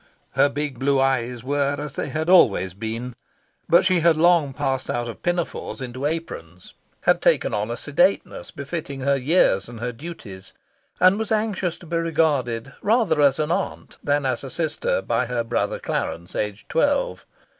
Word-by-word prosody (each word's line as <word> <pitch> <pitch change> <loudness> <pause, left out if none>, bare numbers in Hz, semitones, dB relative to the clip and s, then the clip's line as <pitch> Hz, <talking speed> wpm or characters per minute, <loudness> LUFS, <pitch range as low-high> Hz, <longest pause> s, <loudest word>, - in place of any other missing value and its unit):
Her 145 - +3
big 140 -3 -4
blue 140 0 +2
eyes 125 -3 0
were 140 +1 0
as 145 -1 -6
they - - -3
had 155 +1 -2
always 105 - +5
been; 115 +4 -5 0.6
but 175 +3 +5
she 185 -1 +3
had 165 -1 +4
long 165 -3 +4
passed 135 0 -2
out 120 0 -1
of 115 - -8
pinafores 175 -3 -2
into 130 +2 -3
aprons, 90 - -6 0.3
had - - +3
taken - - +2
on 105 +2 -1
a 120 - -3
sedateness 175 +9 0
befitting 140 -1 -6
her 140 +1 +2
years 130 - +2
and 120 -2 -9
her 120 +1 -3
duties, 115 - -10 0.5
and 185 +3 +5
was 220 -1 -3
anxious 210 -5 0
to - - -14
be 170 +1 -2
regarded 145 -7 0
rather 205 -8 +2
as 140 -2 +4
an 155 +1 -1
aunt 190 +2 -3
than 145 -1 +1
as 130 -1 -1
a 135 - -6
sister 155 - -1
by 120 +1 0
her 120 -1 -1
brother 115 -3 -1
Clarence, 85 +1 -4
aged 105 -1 -3
twelve. - - 0
140 Hz, 175 wpm, -23 LUFS, 120-170 Hz, 0.6 s, always